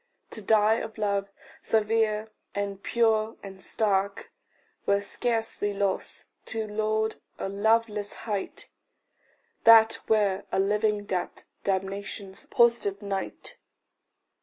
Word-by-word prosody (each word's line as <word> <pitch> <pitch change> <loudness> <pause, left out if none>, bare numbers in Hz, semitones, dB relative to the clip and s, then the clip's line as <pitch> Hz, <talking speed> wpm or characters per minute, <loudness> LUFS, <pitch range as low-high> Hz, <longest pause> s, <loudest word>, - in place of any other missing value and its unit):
To 220 - -7
die 215 +1 +4
of 220 0 -7
love 200 -2 0 0.3
severe 220 0 +1 0.3
and 200 -1 -3
pure 225 -1 +1
and 195 -1 -10
stark, 200 -2 0 0.6
Were 200 0 +4
scarcely 225 -1 -1
loss; 195 -1 -2 0.2
to 220 -1 -3
lord 215 +1 -1 0.2
a - - -3
loveless 210 +1 +1
height 205 -3 -4 1.0
That 225 -1 +7
were 205 -3 +2
a - - 0
living 210 +1 +1
death, 180 -3 -3 0.2
damnation's 195 0 -3
positive 235 -4 +2
night. 195 -1 -4
210 Hz, 105 wpm, -27 LUFS, 200-220 Hz, 1.0 s, That